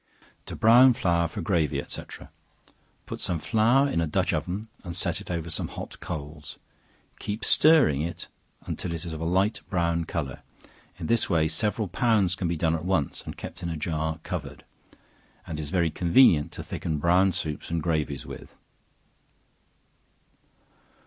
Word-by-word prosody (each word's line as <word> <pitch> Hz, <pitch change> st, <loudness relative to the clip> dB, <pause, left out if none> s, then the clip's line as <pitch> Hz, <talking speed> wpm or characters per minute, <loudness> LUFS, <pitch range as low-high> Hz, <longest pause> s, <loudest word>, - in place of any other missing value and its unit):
To -, -, -6 dB
Brown 125 Hz, +3 st, +7 dB
Flour 85 Hz, -5 st, +1 dB
for -, -, -6 dB
Gravy, 85 Hz, -7 st, +1 dB
&c. -, -, -5 dB, 1.0 s
Put -, -, -6 dB
some 90 Hz, -, -1 dB
flour 120 Hz, -, +3 dB
in 85 Hz, -12 st, 0 dB
a 80 Hz, -, 0 dB
dutch 75 Hz, -, 0 dB
oven 100 Hz, +5 st, -3 dB, 0.2 s
and 85 Hz, -3 st, -6 dB
set -, -, -1 dB
it -, -, -12 dB
over 85 Hz, -1 st, -3 dB
some 80 Hz, -, -2 dB
hot -, -, -8 dB
coals; 75 Hz, 0 st, -7 dB, 0.6 s
keep 105 Hz, +2 st, -4 dB
stirring 150 Hz, -, +5 dB
it 85 Hz, +3 st, -5 dB, 0.4 s
until 85 Hz, -, -4 dB
it 85 Hz, +1 st, -5 dB
is 85 Hz, -, -5 dB
of 80 Hz, -, -6 dB
a -, -, -2 dB
light 95 Hz, +5 st, +1 dB
brown 85 Hz, -3 st, 0 dB
color; 70 Hz, -6 st, -4 dB, 0.6 s
in -, -, -6 dB
this 115 Hz, -1 st, +2 dB
way 80 Hz, -4 st, +3 dB
several 105 Hz, +6 st, -1 dB
pounds 100 Hz, -1 st, +2 dB
can 95 Hz, -2 st, -2 dB
be 85 Hz, 0 st, -1 dB
done 80 Hz, 0 st, +1 dB
at 80 Hz, -1 st, -2 dB
once, 90 Hz, -6 st, 0 dB
and -, -, -7 dB
kept 90 Hz, -, -8 dB
in 85 Hz, -, -3 dB
a 80 Hz, -, -3 dB
jar 80 Hz, 0 st, -2 dB
covered; 75 Hz, -6 st, -6 dB, 0.8 s
and 80 Hz, -2 st, -5 dB
is 75 Hz, -2 st, -4 dB
very 85 Hz, -1 st, +1 dB
convenient 85 Hz, -, +4 dB
to -, -, -6 dB
thicken 80 Hz, -2 st, -3 dB
brown 90 Hz, +5 st, +4 dB
soups 80 Hz, -4 st, -4 dB
and 85 Hz, -2 st, -1 dB
gravies 75 Hz, -5 st, -1 dB
with. -, -, -10 dB
85 Hz, 165 wpm, -26 LUFS, 80-95 Hz, 1.0 s, Brown